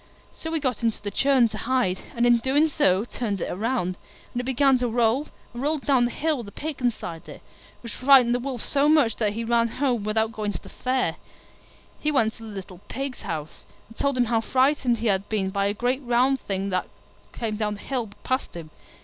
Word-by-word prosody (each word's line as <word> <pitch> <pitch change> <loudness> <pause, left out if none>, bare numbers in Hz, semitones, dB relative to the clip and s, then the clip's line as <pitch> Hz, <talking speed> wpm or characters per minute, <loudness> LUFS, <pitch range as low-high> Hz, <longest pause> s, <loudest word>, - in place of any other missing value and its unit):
So 320 - -6
he 325 - 0
got 255 -6 -1
into 230 -2 0
the 205 - -5
churn 270 -2 +4
to 215 - -6
hide, 240 -7 0 0.2
and 235 0 +2
in 240 0 +6
doing 280 +6 +2
so 190 -6 +2
turned 215 -5 -3
it - - -3
round, 190 -3 -1 0.4
and 245 - -2
it - - -8
began 265 0 +3
to 245 - 0
roll, 240 +5 +1 0.3
and 240 - -6
rolled 295 +1 -1
down 260 -4 +4
the 240 - -1
hill 315 +2 0
with 235 -4 -7
the - - -9
Pig 300 +4 -5
inside 180 -9 -3
it, - - -11 0.4
which 235 -3 -7
frightened 255 -2 +5
the 245 - +1
Wolf 255 -2 -4
so 285 +1 +2
much 295 -8 +4
that 210 -3 0
he 230 +2 -3
ran 230 0 +2
home 245 -2 -1
without 220 +1 +1
going 215 -2 -3
to - - -7
the - - -11
Fair. 255 0 -1 0.8
He 305 - +1
went 225 -6 +2
to 225 - -12
the 220 - -8
little 190 -3 -8
Pig's 270 -1 -5
house, 160 -4 -6 0.3
and 225 - -14
told 280 +1 0
him 245 - +3
how 225 -1 +1
frightened 260 0 +2
he 230 - -5
had 195 -2 +1
been 195 -3 0
by 200 0 +1
a 200 - 0
great 250 +5 0
round 255 +2 +2
thing 195 -1 -3
which 185 - +2 0.5
came 225 -3 -3
down 210 -1 -1
the 205 - -11
hill 250 -5 -3
past 260 -6 -2
him. 160 -2 -8
235 Hz, 225 wpm, -25 LUFS, 210-265 Hz, 0.8 s, in